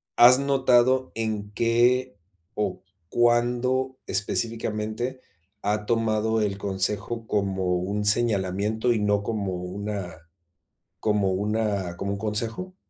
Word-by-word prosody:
¿has 125 +2 +8
notado 130 -2 +3
en 110 -2 -3
qué 120 +4 +2 0.4
o 105 - -2 0.3
cuándo 120 +3 +1
específicamente 115 +3 -1 0.4
ha 105 +1 -1
tomado 110 -1 +1
el 100 -2 -1
consejo 105 +4 -2
como 95 -3 0
un 100 +4 -2
señalamiento 105 +1 +1
y 110 - 0
no 105 0 +1
como 100 -3 -2
una 90 -1 -5 0.8
como 105 -3 +1
una 100 -2 -1
como 100 +2 -3
un 100 - -3
consejo? 115 - -3
110 Hz, 105 wpm, -25 LUFS, 100-120 Hz, 0.8 s, has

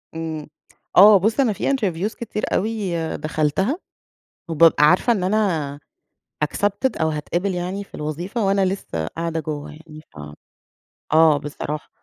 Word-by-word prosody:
إمم. 160 -2 -5 0.5
آه. 205 +1 +9
بُص، 220 +7 0
أنا 235 -6 +3
في 195 - -2
interviews 205 -5 -1
كتير 215 -2 -5
أوي 215 -3 -1 0.3
دخلتها، 155 - 0 0.7
وبابقى 160 -1 +5
عارفة 180 +9 +4
إن 190 -4 -2
أنا 175 -9 0 0.7
accepted 205 - -1
أو 160 - +2
هاتقبل 175 +5 -2
يعني 185 +3 -3
في - - -29
الوظيفة 175 +9 -3
وأنا 195 0 +2
لسّه 135 - -3
قاعدة 165 - -3
جوّه 150 -1 -5
يعني 155 0 -13
ف 75 - -14 1.0
آه 160 -2 +6
بصراحة. 150 +1 -6
175 Hz, 135 wpm, -21 LUFS, 155-200 Hz, 1.0 s, آه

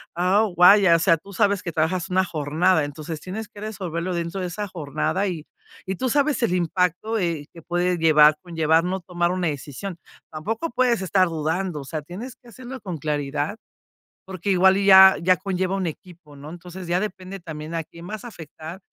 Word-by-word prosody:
a 185 +5 +3
o 215 - 0
vaya 180 0 +7
o 165 - +2
sea 165 -1 +4
tú 200 +5 -14
sabes 200 -1 +1
que 170 - -4
trabajas 165 +3 -1
una 190 +1 +3
jornada 160 +2 +1
entonces 155 +2 -7
tienes 210 +4 -6
que 205 - -13
resolverlo 185 -5 -4
dentro 170 +2 -3
de 180 - -2
esa 205 +4 -5
jornada 170 +3 -2
y 165 -5 -5 0.4
y 190 - -3
tú 260 - -1
sabes 285 +2 +1
el 180 - +1
impacto, 180 +5 0
eh, 165 -6 -2
que 165 - -13
puede 175 +1 0
llevar 155 -2 +6
conllevar 165 -2 +1
no 185 +1 -2
tomar 175 0 -1
una 180 -1 -1
decisión. 155 +5 -5 0.3
Tampoco 220 - -3
puedes 245 -3 +1
estar 185 0 +2
dudando, 160 0 -2
o - - -8
sea, 155 +3 -5
tienes 205 - -8
que 245 - -22
hacerlo 255 +3 -9
con 180 -7 -6
claridad. 145 +3 -2 0.7
Porque 190 +1 -5
igual 190 0 +5
y 200 0 0
ya 190 0 +9
ya 180 +1 +3
conlleva 190 -1 -2
un 195 -1 -2
equipo, 165 -2 -9
¿no?, 145 +2 -10
entonces, 175 +1 -9
ya 175 +1 +1
depende 195 -2 -6
también 160 -1 -7
a 165 - -2
quién 170 +2 -13
vas 215 +3 -7
afectar. 165 -4 -9
180 Hz, 195 wpm, -23 LUFS, 160-195 Hz, 0.7 s, ya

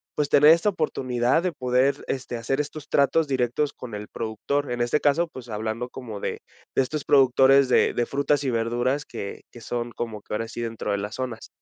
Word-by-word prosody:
pues, 150 -1 0
tener 150 +2 +7
esta 170 +5 +4
oportunidad 130 -4 0
de 180 -3 -1
poder, 130 0 +1
este, 125 -2 -3
hacer 135 +5 -2
estos 150 +1 -8
tratos 150 +3 +3
directos 135 +2 0
con 120 -4 -9
el 105 0 -6
productor? 125 +5 -2
En 120 0 -2
este 120 +5 +2
caso, 155 +4 +2
pues, 125 -2 -10
hablando 110 +3 -3
como 115 -5 -7
de - - -3 0.4
de - - +4
estos 145 +2 -4
productores 135 -1 +5
de - - +4
de 120 - 0
frutas 140 0 +1
y 130 - +1
verduras 120 +5 0
que 100 - -7
que 120 - -12
son 120 +1 -3
como 115 -3 -5
que - - -9
ahora 115 +2 -2
sí 120 - -6
dentro 115 -2 -3
de 100 - +1
las 105 +2 -5
zonas. 125 -4 -5
125 Hz, 205 wpm, -25 LUFS, 115-140 Hz, 0.4 s, tener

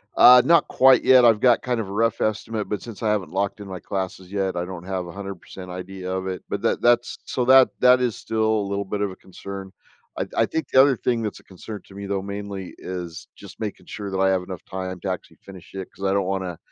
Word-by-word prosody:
Uh, 125 0 +9
not 170 +1 +5
quite 130 -1 +5
yet. 130 -2 +7
I've 115 -3 +5
got 120 -1 +4
kind 125 -2 -1
of 105 -4 -4
a - - -7
rough 115 +3 0
estimate, 110 0 -2
but 105 - -2
since 115 -1 -9
I 110 - +2
haven't 100 -7 -1
locked 100 +2 -1
in 100 - -8
my 95 -1 -6
classes 95 -1 -5
yet, 95 -2 -1
I 90 0 -2
don't 90 -1 -8
have 95 -2 -3
100% 95 0 -8
idea 90 +1 -7
of 95 0 -3
it, 95 -1 -5
but - - -3
that - - 0
that's 120 0 +2
so 125 - -1
that 130 0 +7
that 125 0 +6
is 120 -3 0
still 110 -1 -1
a 110 -2 +1
little 100 0 -2
bit 100 +1 -3
of 100 -2 0
a - - -10
concern. 95 0 -9 0.5
I - - -1
I - - +4
think 160 - -3
the 130 - +4
other 135 -1 +4
thing 120 -2 0
that's 105 -2 -4
a - - -32
concern 100 +3 -9
to 95 - -16
me 100 - -6
though, 100 -1 -2
mainly 100 -1 -6
is 90 -1 -7
just 100 -3 -13
making 105 -2 -6
sure 100 -1 -6
that 95 - -2
I 95 0 +4
have 95 -1 +1
enough 90 -1 -8
time 95 -1 -5
to - - -3
actually - - -6
finish 95 -2 -12
it, 95 -1 -6
'cause 100 - -6
I 95 - +2
don't 100 -1 +1
wanna 95 -2 -3
100 Hz, 255 wpm, -23 LUFS, 95-110 Hz, 0.5 s, Uh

